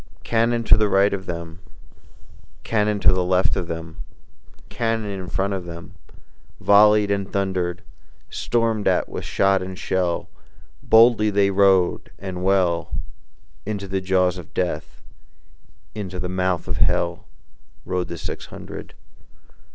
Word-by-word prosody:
Cannon 115 +1 +1
to - - +5
the 105 -1 +2
right 100 +1 +3
of 95 -2 -5
them, 85 0 -6 1.0
Cannon 105 -2 0
to - - +5
the 90 0 +1
left 90 +3 +2
of 90 -4 -3
them, 80 +1 -6 0.7
Cannon 115 -3 -2
in 95 -2 -6
front 100 +2 -1
of 95 -2 -4
them 85 -1 -9 0.7
Volleyed 105 0 +5
and 100 -1 -2
thunder'd; 95 -2 -2 0.4
Storm'd 115 -3 -1
at - - +2
with - - -6
shot 95 -1 +2
and 95 0 -6
shell, 90 -3 -1 0.5
Boldly 110 -1 +5
they 100 -1 +2
rode 95 -2 +3
and 90 -2 -6
well, 90 -3 +1 0.7
Into 100 -1 -4
the 95 0 -2
jaws 95 -1 +1
of 85 - -13
Death, 85 -4 -3 0.9
Into 95 -4 -6
the 90 - -3
mouth 90 -1 -1
of - - -3
Hell, 85 +3 0 0.6
Rode 90 -1 -2
the 85 - -6
six - - -6
hundred. - - -10
95 Hz, 135 wpm, -22 LUFS, 90-105 Hz, 1.0 s, to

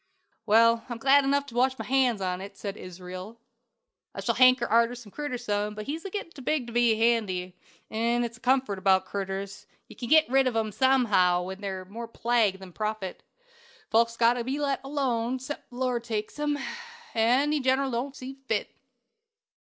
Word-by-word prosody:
"Well, 230 +1 +5
I'm 240 - -4
glad 275 +4 +5
enough 280 +1 +1
to 270 - -12
wash 260 +2 +2
my - - -5
hands 255 -5 +2
on 180 -1 -2
't," 200 +1 -9
said 200 -1 -5
Israel. 185 +4 -9 0.8
"I - - -4
shall - - 0
hanker 255 -1 +5
arter 235 +2 +3
the 235 -4 -12
critter 290 -1 -4
some, 210 -3 -2
but 215 0 -6
he's 315 +3 -4
a - - -3
gettin' 390 -3 -5
too 285 - -11
big 275 0 0
to 235 - -9
be 240 -2 +4
handy; 210 -6 0 0.4
'n 235 +2 +1
it's 235 0 -5
one - - -36
comfort 255 -5 +1
about 190 0 +3
critters, 195 0 -5 0.2
you - - -13
ken 240 - -6
git 315 +1 +6
rid 270 +1 +3
on 240 -3 0
'em 220 -1 0
somehaow 205 -8 +3
when 190 +2 -7
they're 190 -2 -4
more 230 +5 -7
plague 230 -4 +1
than 190 -2 -12
profit. 215 -2 -4 0.7
But 220 - +5
folks 230 0 +2
has - - -14
got 235 0 +5
to 245 -1 -3
be 265 +4 -2
let 280 -2 -1
alone, 260 -4 -1
excep' 260 +3 -7
the 245 - -14
Lord 250 -2 -1
takes 220 +3 -4
'em; 295 -1 0 0.6
an' 245 +6 +3
He 305 - +1
generally 265 0 +1
don't 255 +4 -3
see 265 +1 -9
fit." 220 -2 -1
235 Hz, 200 wpm, -27 LUFS, 205-260 Hz, 0.8 s, git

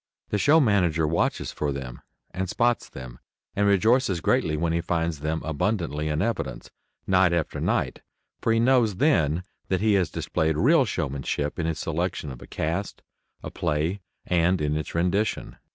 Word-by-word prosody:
The 105 - 0
show 150 +9 +5
manager 90 - +2
watches 80 +2 0
for 75 -1 -2
them 65 -3 -6 0.3
and 95 0 -3
spots 120 +3 +1
them, 65 -2 -10 0.4
and 100 0 +2
rejoices 100 0 +3
greatly 80 -1 +1
when 80 +1 0
he 85 - +1
finds 85 -2 -1
them 80 +2 -2
abundantly 80 -1 -1
in 75 +1 0
evidence, 115 -1 -3 0.3
night 95 -2 +3
after 85 -3 -1
night, - - -1 0.4
for 115 - +1
he 115 - +3
knows 120 -4 +3
then 90 - +2 0.2
that 95 - 0
he 110 -1 +3
has 95 -5 +2
displayed 80 -1 -1
real 140 - +4
showmanship 70 - -3
in 80 - 0
his 80 -1 -2
selection 80 -2 -2
of - - -10
a - - -11
cast, 85 +5 -3 0.4
a - - -6
play, 80 +6 -1 0.2
and 90 +1 +2
in 75 0 0
its 75 0 -4
rendition. 100 +5 0
85 Hz, 170 wpm, -25 LUFS, 75-100 Hz, 0.4 s, show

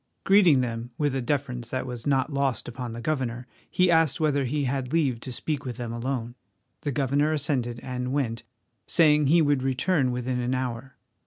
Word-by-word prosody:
Greeting 185 -9 +5
them 120 -1 -3
with 145 -3 0
a 135 - -1
deference 125 -3 -2
that 130 +1 -2
was 125 -1 -6
not 140 +1 +1
lost 140 -2 -1
upon 125 0 -5
the 120 - -6
governor, 125 -3 -2 0.2
he 180 -1 +3
asked 160 -4 +3
whether 145 -3 +1
he 145 +3 -1
had 130 -1 -2
leave 145 -8 +1
to 130 - -7
speak 145 +3 -3
with 125 -3 -5
them 120 -2 -4
alone. 120 0 -3 0.5
The 145 - -2
governor 145 +2 +1
assented 130 -5 -1
and 125 0 -3
went, 125 -5 -1 0.5
saying 150 -3 +4
he 165 +3 +5
would 145 -3 +2
return 135 +2 +1
within 125 0 -2
an 125 +1 0
hour. 130 0 -4
130 Hz, 185 wpm, -26 LUFS, 125-145 Hz, 0.5 s, Greeting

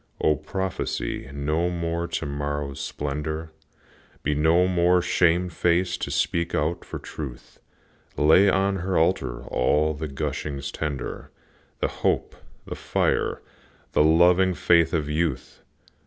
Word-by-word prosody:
O, 75 - +3
prophesy 80 -6 -3
no 75 +5 0
more 85 -1 -2
to 85 - -3
morrow's 70 -1 -3
splendor, 75 +2 -4 0.7
Be 75 - +1
no 80 +5 +3
more 90 0 +3
shame 90 0 +2
faced 90 +1 0
to - - -2
speak 85 +4 0
out 80 +4 -1
for - - -7
Truth, 70 -6 -9 0.6
Lay 80 +7 +6
on 95 +1 +1
her 95 +1 -1
altar 80 -7 0
all 75 +5 +1
the 75 +1 -5
gushings 70 0 -4
tender, 70 -5 -5 0.5
The - - +2
hope, - - 0 0.3
the - - -5
fire, - - -1 0.5
the - - +4
loving 90 +3 +4
faith 85 -1 +3
of 75 -3 -1
youth! 75 -3 -2
80 Hz, 125 wpm, -25 LUFS, 75-90 Hz, 0.7 s, Lay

